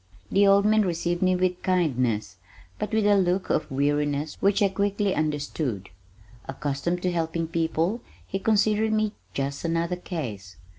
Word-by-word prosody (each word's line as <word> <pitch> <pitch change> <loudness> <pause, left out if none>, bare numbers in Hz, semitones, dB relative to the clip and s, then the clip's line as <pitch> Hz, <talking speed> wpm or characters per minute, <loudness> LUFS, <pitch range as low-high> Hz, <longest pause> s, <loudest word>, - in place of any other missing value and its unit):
The 200 +1 +4
old 200 +1 +5
man 215 0 +4
received 175 -1 -1
me 185 0 +3
with 180 0 0
kindness, 125 - 0 0.4
but - - -3
with 220 -1 +2
a 205 0 +5
look 185 0 +1
of - - 0
weariness 145 +2 0
which 200 +1 +3
I 200 - +4
quickly 200 0 0
understood. 145 - -2 0.6
Accustomed 145 +5 -2
to 180 - +1
helping 165 -1 -1
people 165 +6 -1 0.2
he 195 - -3
considered 215 +1 +2
me 215 -1 +1 0.2
just 140 +1 -3
another 170 +1 -1
"Case." 115 - -6
175 Hz, 150 wpm, -25 LUFS, 145-195 Hz, 0.6 s, old